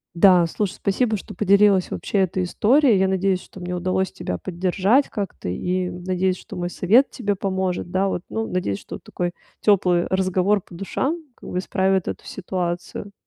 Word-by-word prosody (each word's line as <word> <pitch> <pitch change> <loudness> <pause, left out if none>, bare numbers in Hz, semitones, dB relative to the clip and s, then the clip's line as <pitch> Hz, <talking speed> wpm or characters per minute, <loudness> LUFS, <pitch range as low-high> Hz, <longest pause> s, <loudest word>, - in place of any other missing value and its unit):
Да, 180 -1 +6
слушай, 200 +3 -2
спасибо, 215 +3 0
что - - -10
поделилась 200 -2 +4
вообще 200 - -1
этой 185 0 +1
историей. 235 +5 +3
Я 190 0 +3
надеюсь, 190 -1 +1
что 190 - -13
мне 180 0 -4
удалось 185 +1 0
тебя 90 - -4
поддержать 190 +8 +1
как-то, 200 - -5
и 180 - -1
надеюсь, 185 +1 -1
что - - -10
мой 175 0 -3
совет 225 +11 +3
тебе 205 -5 -1
поможет. 190 -2 -2
Да, 190 +2 +1
вот, 180 -2 -2
ну, 225 0 -2
надеюсь, 140 - -1
что - - -8
вот - - -12
такой 175 -1 -3 0.3
тёплый 180 -4 +3
разговор 190 +1 +1
по - - -17
душам 270 - -2
как - - -11
бы 180 - -1
исправит 190 -1 +1
эту - - -5
ситуацию. 180 +1 -4
190 Hz, 175 wpm, -22 LUFS, 180-200 Hz, 0.3 s, Да